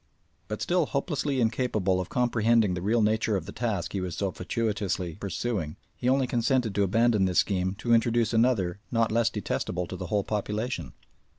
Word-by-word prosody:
But 105 - -4
still 175 -4 +1
hopelessly 140 -2 -1
incapable 110 -6 +1
of 90 - -7
comprehending 115 -4 +2
the 90 - -3
real 110 +4 +2
nature 110 0 +1
of 85 - -5
the - - -7
task 110 -7 -2
he 100 - -1
was 90 -2 -4
so 100 -2 -1
fatuitously 95 -3 -2
pursuing, 100 -5 -3 0.2
he 125 - -1
only 135 0 +3
consented 120 -2 +1
to 100 - +1
abandon 110 +1 +3
this 90 -1 0
scheme 95 -1 +1
to 120 +3 0
introduce 115 -1 +2
another 110 -6 +2
not 115 -1 +1
less 115 +1 +3
detestable 90 -4 -2
to 90 - -7
the - - -6
whole 105 -2 +1
population. 105 +4 -3
110 Hz, 180 wpm, -27 LUFS, 95-120 Hz, 0.2 s, only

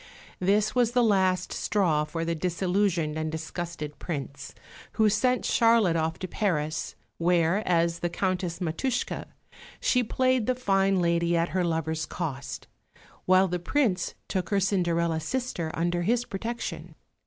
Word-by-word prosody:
This 205 +3 +2
was 240 -2 +2
the 245 -1 +4
last 185 -4 +2
straw 165 -7 +1
for 165 +2 -4
the 170 - 0
disillusioned 180 -2 0
and 155 0 -2
disgusted 160 -1 -5
Prince, 140 -3 -6 0.4
who 220 -1 +4
sent 250 +5 +1
Charlotte 230 -7 +4
off 160 0 0
to 185 - -5
Paris, 160 -6 -1 0.2
where 170 +2 +2
as 170 -1 +2
the 175 - -1
Countess 180 -1 -2
Matushke 210 +9 -2 0.5
she 250 -1 +2
played 255 0 +1
the 255 - +2
fine 195 -5 +2
lady 170 0 +2
at 170 +1 +1
her 185 -1 0
lover's 160 -1 -1
cost, 140 -6 -5 0.6
while 185 +1 +5
the 180 0 -2
Prince 190 -2 0
took 185 -2 -2
her 200 -2 +2
Cinderella 170 -4 +1
sister 175 -1 -3
under 175 +1 0
his 240 +6 +1
protection. 230 +5 -5
180 Hz, 140 wpm, -27 LUFS, 165-205 Hz, 0.6 s, while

